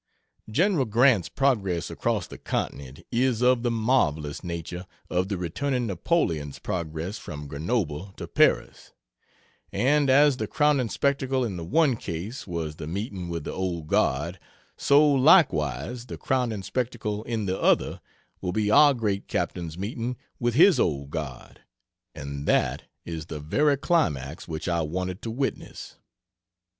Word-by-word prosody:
General 165 - +2
Grant's 115 -3 +3
progress 100 - 0
across - - -1
the - - -11
continent 70 +3 -4
is 125 -1 +1
of 125 -1 +4
the 120 - 0
marvelous 100 - 0
nature 90 +1 -5 0.2
of 90 +1 +1
the 100 -1 -2
returning 125 - -1
Napoleon's 85 - -1
progress 85 +3 -4
from 75 -1 -7
Grenoble 80 - -2
to - - -6
Paris; - - +1 0.8
and 140 +6 +2
as 140 0 +5
the - - -3
crowning 145 -5 +2
spectacle 135 -1 0
in 100 -5 -4
the 85 - -5
one 145 - +3
case 100 +8 -6
was 80 -4 -4
the 75 - -6
meeting 95 0 -4
with 85 -2 -4
the - - -4
Old 90 -4 -3
Guard, 75 +5 0 0.4
so, 145 +2 +5
likewise, 125 - +3
the - - -7
crowning 120 -6 -1
spectacle 110 -3 -2
in 115 -3 -2
the 95 0 -2
other - - +2 0.4
will 90 - -2
be 105 0 +1
our 145 +4 +7
great 105 -4 -2
captain's 85 -2 -3
meeting 115 +5 -3 0.2
with 120 -1 0
his 180 +5 +6
Old 70 -3 0
Guard 75 -6 -6 0.5
and 70 -1 -6
that - - +1 0.2
is 80 -2 -6
the 75 - -6
very 140 - +2
climax 80 - 0
which 80 -2 -5
I 85 -1 +1
wanted 90 +4 -3
to 115 - -5
witness. 135 +5 -4
100 Hz, 145 wpm, -26 LUFS, 80-130 Hz, 0.8 s, our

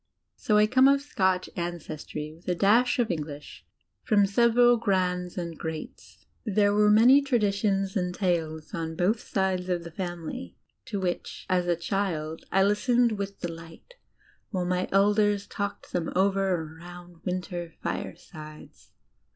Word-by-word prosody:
So 210 - +1
I 210 - +6
come 260 +4 +5
of 280 0 +5
Scotch 190 -10 0
ancestry, 155 -3 -5
with 165 +2 -20
a 180 - +1
dash 225 +7 +3
of 240 -3 +1
EngHsh 150 -4 -5 0.4
from 205 -2 +3
several 235 +4 +4
"grands" 180 -4 -1
and 170 -2 -4
"greats." 160 -1 -8 0.2
There 205 -2 +2
were 210 0 +4
many 240 +7 +7
traditions 200 -6 0
and 180 -2 0
tales 165 -4 -2
on 160 -1 -4
both 190 +6 +1
sides 190 -2 -1
of 175 -2 -1
the 170 - -9
family, 170 - -6 0.3
to 220 -6 -4
which, 180 -2 -4
as 180 -1 +2
a 175 - +2
child, 165 -3 -3
I 195 - +4
listened 235 +4 +3
with 200 -2 -5
delight 165 - -8 0.6
white 185 -4 -2
my 180 +1 -1
elders 205 +1 +3
talked 200 0 -5
them 170 -2 -1
over 195 +1 +2
around 175 +1 -7
winter 180 -2 -4
firesides. 155 -3 -8
185 Hz, 145 wpm, -27 LUFS, 170-210 Hz, 0.6 s, many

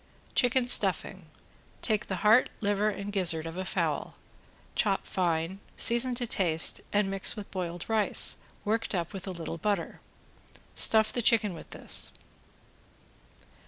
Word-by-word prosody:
~CHICKEN 245 0 +2
STUFFING~ 245 - +2 0.6
Take 215 -3 0
the 190 - -3
heart, 220 +4 +5
liver, 205 0 0
and 200 0 -6
gizzard 165 -5 +2
of 165 0 -7
a 185 - -4
fowl, - - -3 0.6
chop 200 -3 0
fine, 175 +1 -2 0.2
season 240 +2 +3
to 245 0 -1
taste 170 -7 +1
and 205 -1 +1
mix 195 +3 +4
with 210 -2 -9
boiled 175 -2 -5
rice, 220 -2 +1 0.3
worked 220 0 -1
up 170 +2 -3
with 195 0 -7
a - - -3
little 170 -1 -6
butter. 200 -2 -2 0.7
Stuff 220 -1 +4
the 240 - 0
chicken 220 -4 +3
with 165 - -11
this. - - -2
200 Hz, 140 wpm, -28 LUFS, 180-220 Hz, 0.7 s, heart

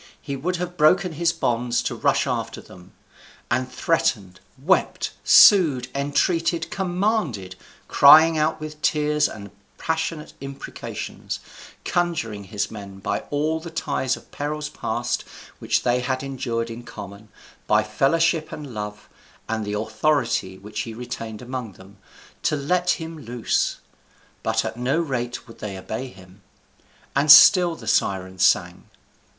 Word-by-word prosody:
He 140 - -5
would 175 +7 -2
have 180 0 -5
broken 180 +4 +4
his 165 +2 +1
bonds 120 -7 -1
to - - -2
rush - - +1
after - - -3
them; 90 0 -15 0.6
and 130 +1 0
threatened, 115 - 0 0.2
wept, 165 +9 +1
sued, 150 - +6
entreated, 165 +4 0
commanded, 180 - -1 0.3
crying 160 +3 +7
out 155 +1 0
with 155 0 -8
tears 150 0 +2
and 100 -3 -10 0.3
passionate 160 -1 -3
imprecations, 135 0 -6 0.5
conjuring 145 - -1
his 100 +2 -3
men 100 -3 -9
by 95 - -2
all 155 +2 0
the 170 +1 -8
ties 135 -4 -1
of - - -18
perils 150 +1 -4
past - - -3 0.4
which - - 0
they 125 0 +2
had 130 +1 -2
endured 120 -4 -3
in 115 +1 -7
common, 100 -2 -10 0.4
by 105 0 +4
fellowship 155 +8 +1
and 145 -5 -8
love, 105 -1 -6 0.4
and 110 -1 -2
the 105 0 -3
authority 110 -3 0
which 105 +2 -8
he 115 -1 -4
retained 115 -1 -7
among 125 -4 -6
them, 95 +3 -16 0.4
to - - +1
let 175 +5 0
him 160 -1 -7
loose; 120 -3 -1 0.6
but 110 0 0
at 110 +1 -5
no 130 +6 0
rate 125 -7 -3
would 115 - -14
they 100 -2 -5
obey 110 +7 -5
him. 95 -3 -16 0.7
And 145 +2 +5
still 175 +1 +8
the - - -12
Sirens 95 -1 0
sang. 90 -1 +2
130 Hz, 140 wpm, -23 LUFS, 110-160 Hz, 0.7 s, still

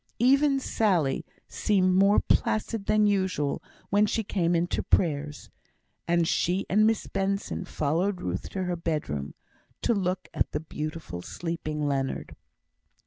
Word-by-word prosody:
Even 275 +3 +4
Sally 185 - +1 0.2
seemed 185 -3 +2
more 195 +2 +5
placid 215 -1 0
than 215 0 +4
usual 190 -8 0 0.3
when 205 +1 +4
she 225 - 0
came 175 -4 0
in 170 +1 +2
to - - -2
prayers; 150 -3 0 0.6
and 170 -1 +2
she 180 +4 +1
and 215 +3 +5
Miss 225 -1 +1
Benson 195 -1 -2
followed 175 +5 0
Ruth 90 - -4
to 190 - -3
her 180 -1 -1
bedroom, 150 - -3 0.5
to - - +3
look 185 -3 -1
at - - 0
the - - 0
beautiful 155 - -6
sleeping 155 - -4
Leonard. 135 -1 -2
180 Hz, 140 wpm, -27 LUFS, 155-205 Hz, 0.6 s, more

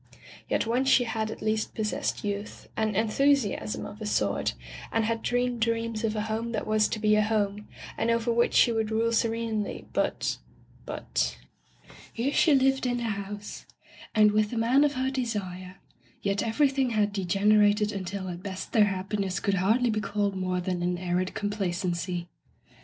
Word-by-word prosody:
Yet - - +1
once 250 +4 +1
she 260 - +5
had 220 -2 -2
at 220 - -7
least 215 0 -1
pos 215 -1 -1
sessed - - -2
youth, 205 0 -5
and 220 -2 0
enthusiasm 225 0 +1
of 210 - -10
a 215 - -3
sort, 100 - 0 0.4
and 225 - +1
had 225 0 -1
dreamed 245 0 0
dreams 230 -1 0
of 220 -1 0
a 210 - -1
home 220 +2 -3
that 215 - -2
was 215 0 +3
to 220 - -3
be 215 0 +3
a 215 - +4
home, 210 -1 0 0.3
and 230 - +1
over 230 0 +1
which 235 +1 +2
she 240 - +6
would 220 -1 0
rule 225 +1 +1
serenely, 225 -2 -1
but - - 0 0.2
— - - -27
^but - - -2 0.4
— - - -20
Here 265 +5 -1
she 305 -4 +5
lived 270 -1 +2
in 245 0 0
the 240 - -3
house, 205 -1 -5 0.5
and 210 -1 +6
with 210 0 +2
the 235 - -4
man 245 +5 +4
of 290 -1 +2
her 260 +1 0
desire, 195 -8 -4 0.5
yet 200 0 0
everything 265 +2 +2
had 210 -3 +1
degenerated 205 +2 +3
until 190 -1 -4
at 175 -1 -6
best 190 -1 -6
their 215 -3 +6
happiness 195 0 -2
could 200 - 0
hardly 230 +5 +3
be 215 0 -1
called 205 -1 -1
more 185 -1 -1
than 180 0 -2
an 175 0 0
arid 180 +2 -1
complacency. 180 -4 -2
215 Hz, 180 wpm, -27 LUFS, 200-230 Hz, 0.5 s, she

